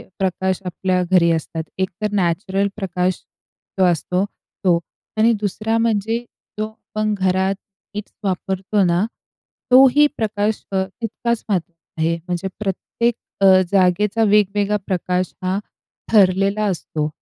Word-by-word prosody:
अ, - - -15
प्रकाश 190 0 0
आपल्या 185 0 0
घरी 170 -2 +5
असतात. 160 0 -2 0.2
एकतर 195 +3 -2
नॅचरल 190 +2 +1
प्रकाश 185 -2 -1 0.6
जो 190 - +5
असतो 180 +2 +1 0.4
तो 175 -2 +4 0.4
आणि 225 +2 +5
दुसरा 215 +2 -1
म्हणजे 225 0 +1 0.4
जो 215 - 0
आपण 215 -1 -3
घरात 190 +1 +2 0.4
लाईट्स 210 0 -6
वापरतो 195 +2 0
ना, 175 +3 +2 0.7
तोही 270 +3 +7
प्रकाश 215 -1 -1
अ, 190 0 +2
तितकाच 230 +3 -3
महत्त्वाचा 170 -4 -4
आहे. 165 +1 +2
म्हणजे 180 +2 -2
प्रत्येक 215 +4 -1 0.3
अ, 195 - +5 0.3
जागेचा 195 +4 +3
वेगवेगळा 205 0 +3
प्रकाश 180 -1 -1
हा 185 +2 0 0.5
ठरलेला 200 +1 +4
असतो. 155 -2 -3
195 Hz, 120 wpm, -20 LUFS, 180-215 Hz, 0.7 s, तोही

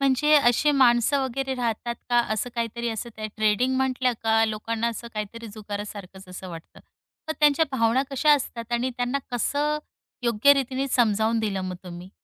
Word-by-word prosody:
म्हणजे 275 +2 +2
अशी 280 +2 +4
माणसं 265 0 +3
वगैरे 265 +1 -3
राहतात 235 -1 -2 0.2
का 240 - +4
असं 220 +3 -2
काहीतरी 235 0 -2
असं 225 +1 -4
त्या 215 0 -4
ट्रेडिंग 220 +4 +2
म्हटलं 260 -1 +1
का 225 0 +3
लोकांना 225 +1 -2
असं 235 0 -6
काहीतरी 215 +2 -5
जुगारासारखंच 205 -3 -8
असं 185 +1 -8
वाटतं. 165 -2 -11 0.5
तर - - +1
त्यांच्या 300 +2 +5
भावना 235 +1 +2
कशा 290 +3 +4
असतात 235 -4 -5
आणि 240 +2 0
त्यांना 245 +2 -1
कसं 290 +5 0 0.4
योग्य 235 +3 +5
रीतीने 270 0 -1
समजावून 225 -2 +2
दिलं 205 -3 -1
मग 185 -1 -4
तुम्ही? 175 +1 -9
235 Hz, 160 wpm, -25 LUFS, 215-260 Hz, 0.5 s, त्यांच्या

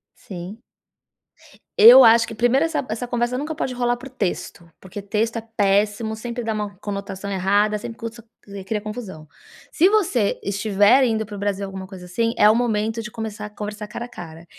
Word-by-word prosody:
Sim. 190 +5 -9 1.2
Eu 475 +3 +10
acho 225 0 +6
que 225 - -8
primeiro 245 +6 +2
essa 315 -5 -2
essa 225 +3 -4
conversa 240 0 -1
nunca 300 +4 -4
pode 260 -3 -3
rolar 245 -1 0
por 260 - -10
texto, 180 -8 -5
porque 190 +2 -9
texto 220 +3 -1
é - - -3 0.2
péssimo, 205 +2 +1
sempre 235 +2 -5
dá 225 -1 -2
uma 210 -1 -4
conotação 200 0 -6
errada, 205 +3 +1
sempre 230 +2 -8
cos 230 +1 -7 0.2
cri 200 -1 -9
cria 210 +1 -2
confusão. 210 -7 -8 0.4
Se 350 +4 +4
você 330 - +1
estiver 205 +5 +3
indo 220 -2 0
para 205 0 -9
o - - -7
Brasil, 200 0 -2
alguma 190 -1 -8
coisa, 185 -2 -11
assim, 230 +6 -1
é 210 - +6
o - - +5
momento 225 -1 -1
de 215 - -7
começar 220 -2 -6
a 210 - -7
conversar 210 0 -7
cara 225 - -6
a - - -10
cara. 165 -6 -10
215 Hz, 195 wpm, -22 LUFS, 200-235 Hz, 1.2 s, Eu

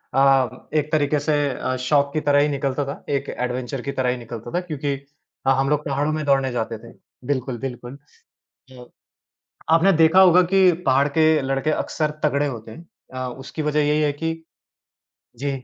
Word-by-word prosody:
अ, 135 -3 +2
एक 150 0 0
तरीक़े 150 -1 +1
से 150 +2 -1 0.2
अ, 130 0 -3
शौक 140 +2 +1
की 155 - -1
तरह 145 -1 +3
ही 145 - +3
निकलता 140 0 -2
था, 140 - -7
एक 140 -1 -1
एडवेंचर 125 +1 -4
की 140 - -4
तरह 130 -2 -1
ही 125 - -1
निकलता 115 0 -8
था 175 - -1
क्योंकि 150 -5 -3 0.5
ह 135 - +6
हम 135 - +1
लोग 150 0 +1
पहाड़ों 145 +2 -1
में 155 0 -2
दौड़ने 135 -2 +2
जाते 115 -1 -3
थे। 115 0 -13 0.4
बिल्कुल, 130 -3 -2
बिल्कुल, 125 0 -7 0.7
अ, 125 -1 -12 0.9
आपने 180 +4 +5
देखा 165 +4 +6
होगा 180 -1 +7
कि 190 -2 +6
पहाड़ 135 +2 +3
के 155 -1 +4
लड़के 135 +3 -1
अक्सर 155 0 -1
तगड़े 145 -1 +1
होते 115 -4 -7
हैं। 170 +8 -12 0.3
अ, 130 0 -4
उसकी 135 +4 -6
वजह 150 0 +1
यही 150 +1 +2
है 150 - +2
कि 165 - 0 1.0
जी 140 +4 -3
140 Hz, 185 wpm, -22 LUFS, 130-150 Hz, 1.0 s, होगा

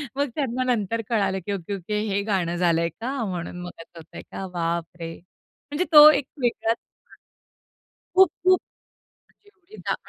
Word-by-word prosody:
मग 285 0 0
त्यांना 255 -4 -1
नंतर 230 -3 0
कळालं, 200 -4 +1
की 205 - -3
ओके-ओके 200 +2 -3
हे 200 0 0
गाणं 180 -5 0
झालं 170 -2 +2
आहे 170 - 0
का, 230 - -6
म्हणून 180 -2 -5
मग 175 - -6
असं 165 +1 -13
होत 160 - -12
आहे - - -6
का? 195 - -5
बापरे! 170 0 -3 0.6
म्हणजे 310 +5 0
तो 300 -1 +11
एक 290 - +2 0.2
वेगळाच 230 -1 0 1.4
खूप-खूप. 370 0 +4 0.7
आणि 410 - -29
एवडी 395 +1 -18
पण - - -3
205 Hz, 155 wpm, -24 LUFS, 175-275 Hz, 1.4 s, तो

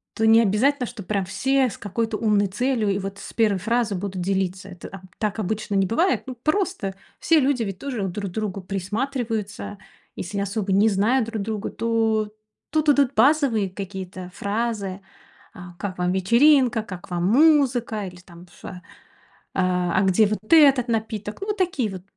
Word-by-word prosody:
то 220 -1 +2
не 225 +1 +7
обязательно, 250 +6 +2
чтоб 220 -6 -9
прям 200 -1 -1
все 265 +7 +1
с - - -9
какой-то 220 +2 -2
умной 210 -2 +2
целью 225 +3 -1
и 195 0 0
вот 195 0 -6
с - - -10
первой 215 -4 +2
фразы 225 +2 0
будут 190 0 -4
делиться. 190 0 -2
Это 180 -2 -10
аб 195 - -9 0.2
так 215 0 -2
обычно 215 +1 -3
не 195 -1 +2
бывает. 340 - +1
Ну 255 - -6
просто 310 - -1 0.3
все 325 -1 +4
люди 270 -3 +1
ведь 195 -3 -5
тоже 245 -9 -3
друг 200 +2 -4
к - - -16
другу 205 -2 -3
присматриваются. 210 +2 -3 0.4
Если 200 +3 -4
особо 200 0 -2
не 200 +3 +4
знают 220 +5 +2
друг 225 -2 -4
друга, 215 0 -3
то 225 -2 0 0.4
тут 310 0 +1
идут 280 -2 +3
базовые 260 -9 +3
какие-то 190 -1 -7
фразы: 200 -2 -3 0.5
"А 180 -4 -11
как 195 -3 -4
вам 180 0 0
вечеринка? 235 +5 +4
Как 185 -4 -9
вам 175 -1 -1
музыка? 245 - +3
Или, 180 -1 -10
там, 175 -1 -15
ш - - -10
а 180 -1 -10 0.7
А 180 -1 +1
а - - +3
где 195 +3 +4
вот 215 - -1
этот 275 -6 +6
напиток?" 220 -2 -3
Ну, 395 - -5
вот 420 - -1
такие 335 - 0
вот 185 -2 -8
215 Hz, 180 wpm, -23 LUFS, 195-245 Hz, 0.7 s, не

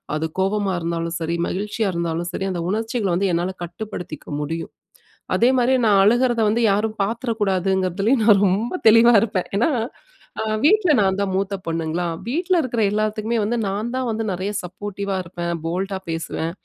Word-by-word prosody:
அது 155 +1 -1
கோபமா 195 +1 +1
இருந்தாலும் 165 0 -3
சரி, 165 +1 -1
மகிழ்ச்சியா 210 +2 -2
இருந்தாலும் 170 0 -2
சரி, 195 - -3
அந்த 175 -2 -3
உணர்ச்சிகள 220 0 -1
வந்து 195 +2 +1
என்னால 175 +2 -1
கட்டுப்படுத்திக்க 175 -2 -7
முடியும். 165 +3 -4 0.6
அதேமாரி 255 +1 +3
நான் 200 -2 +5
அழுகுறத 240 +2 +3
வந்து 230 +3 +1
யாரும் 215 +2 -1
பாத்துட 230 +4 -2
கூடாதுங்குறதுலேயும் 195 +4 +1
நான் 205 -3 +6
ரொம்ப 210 - 0
தெளிவா 230 +2 +7
இருப்பேன் 200 -5 -2
ஏன்னா, 240 +9 +2 0.7
அ - - -1 0.2
வீட்ல 370 +2 +4
நான் 190 -2 +2
தான் 200 -1 0
மூத்த 195 +1 -1
பொண்ணுங்களா! 165 +1 -1 0.2
வீட்ல 350 +9 0
இருக்குற 240 -4 -2
எல்லாத்துக்குமே 215 +2 -1
வந்து 235 +3 0
நான் 210 +4 -2
தான் 260 -1 -1
வந்து 225 0 -2
நெறைய 185 +3 -3
சப்போர்டிவா 200 +2 -5
இருப்பேன். 170 0 -4
போல்ட்டா 190 +4 -2
பேசுவேன். 165 0 -3
200 Hz, 155 wpm, -22 LUFS, 180-225 Hz, 0.7 s, தெளிவா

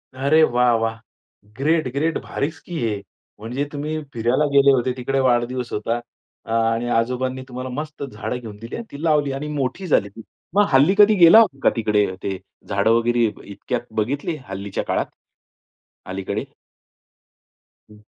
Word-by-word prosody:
अरे, 140 +4 +3
वाह! 125 -3 +3
वाह! 115 0 -2 0.6
ग्रेट, 155 +1 +1
ग्रेट 155 +4 0
भारीच 160 +3 -3
की 175 - -7
हे. 110 -4 -1 0.4
म्हणजे 125 +6 -3
तुम्ही 155 +2 -3
फिरायला 120 +6 +1
गेले 140 0 +6
होते, 130 -1 +2
तिकडे 135 +2 -1
वाढदिवस 125 -1 +1
होता. 115 +3 -1 0.5
अ - - -7
आणि 115 +1 +1
आजोबांनी 125 +3 0
तुम्हाला 130 0 -6
मस्त 150 +4 -6
झाडं 120 -2 -5
घेऊन 110 -4 -9
दिली, 115 +2 -8
आणि 235 - -6
ती 140 +2 -8
लावली, 150 -3 +2
आणि 135 +2 -4
मोठी 145 +7 -2
झाली 100 -9 +2
ती. 105 +3 -12 0.3
मग 205 0 +5
हल्ली 145 +9 +5
कधी 210 +1 +7
गेला 175 +3 +8
होता 175 -12 +2
का - - +6
तिकडे? 105 -3 +2 0.2
ते 95 -1 -2 0.3
झाडं 100 +2 +2
वगैरे 115 0 +3 0.2
इतक्यात 120 +4 -3
बघितली 140 +9 -1
हल्लीच्या 95 +1 -4
काळात? - - -1 1.0
अलीकडे. 95 0 -4 1.5
हं. 105 - -16
125 Hz, 155 wpm, -22 LUFS, 115-145 Hz, 1.5 s, गेला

